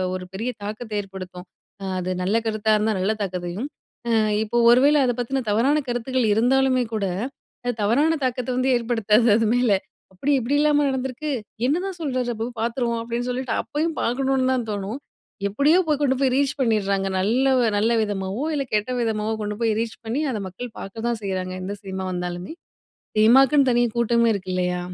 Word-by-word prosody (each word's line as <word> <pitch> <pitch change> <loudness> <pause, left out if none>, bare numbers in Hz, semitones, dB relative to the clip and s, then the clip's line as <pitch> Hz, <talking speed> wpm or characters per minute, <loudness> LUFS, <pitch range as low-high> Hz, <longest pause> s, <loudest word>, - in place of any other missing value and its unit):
ஒரு 185 0 -6
பெரிய 225 +6 -3
தாக்கத்த 215 +2 -6
ஏற்படுத்தும். 185 -2 -9 0.5
அது 185 +1 -3
நல்ல 205 +5 +2
கருத்தா 215 0 0
இருந்தா 215 +1 +1
நல்ல 200 +4 +1
தாக்கத்தையும், 180 +4 -3 0.4
அ - - +1 0.3
இப்போ 235 +2 -2
ஒரு 245 - +6
வேள 295 +1 +5
அத 245 - +1
பத்தின 265 +2 -1
தவறான 270 +8 +3
கருத்துக்கள் 245 0 0
இருந்தாலுமே 255 +2 +3
கூட, 210 -2 0 0.6
அது 245 - 0
தவறான 295 +10 +3
தாக்கத்த 250 0 -2
வந்து 260 +1 +1
ஏற்படுத்தாது, 225 -1 +2
அது 225 -1 +1
மேல. 245 -3 +2 0.4
அப்டி 270 +11 -1
இப்டிலாமா 290 +4 +2
நடந்திருக்கு? 265 +3 -3 0.4
என்னதான் 360 +5 -1
சொல்றார் 255 -4 -1
அப்போ? 225 +2 -3
பாத்துருவோம் 235 0 -1
அப்டின்னு 235 +2 -3
சொல்லிட்டு 255 0 -2
அப்பயும் 310 +2 -2
பாக்கணுன்னு 260 +1 +1
தான் 245 -3 -1
தோணும். 205 +6 -4 0.5
எப்படியோ 290 - +3
போய் 300 -2 +1
கொண்டு 265 -2 +2
போய் 260 -2 +3
ரீச் 280 -1 +1
பண்ணிர்ராங்க, 200 -5 +1
நல்ல 235 +8 +2 0.2
ஒ - - +3
நல்ல 225 +3 +2
விதமாவோ 200 +4 -3
இல்ல 275 -2 -1
கெட்ட 210 +4 0
விதமாவோ 220 -1 -1
கொண்டு 210 0 -3
போய் 225 -2 +2
ரீச் 230 -1 -4
பண்ணி, 235 +7 -1
அத 220 - -2
மக்கள் 225 +5 -8
பாக்க 220 +4 -7
தான் 235 -2 -2
செய்றாங்க. 185 -1 -3
எந்த 200 +2 -4
சினிமா 190 -1 -5
வந்தாலுமே, 180 - -4 0.7
சினிமாக்குன்னு 265 +4 +6
தனி 240 0 +3
கூட்டமே 235 0 +3
இருக்கு 185 -1 -5
இல்லையா? 180 -1 0
235 Hz, 170 wpm, -23 LUFS, 205-260 Hz, 0.7 s, ஒரு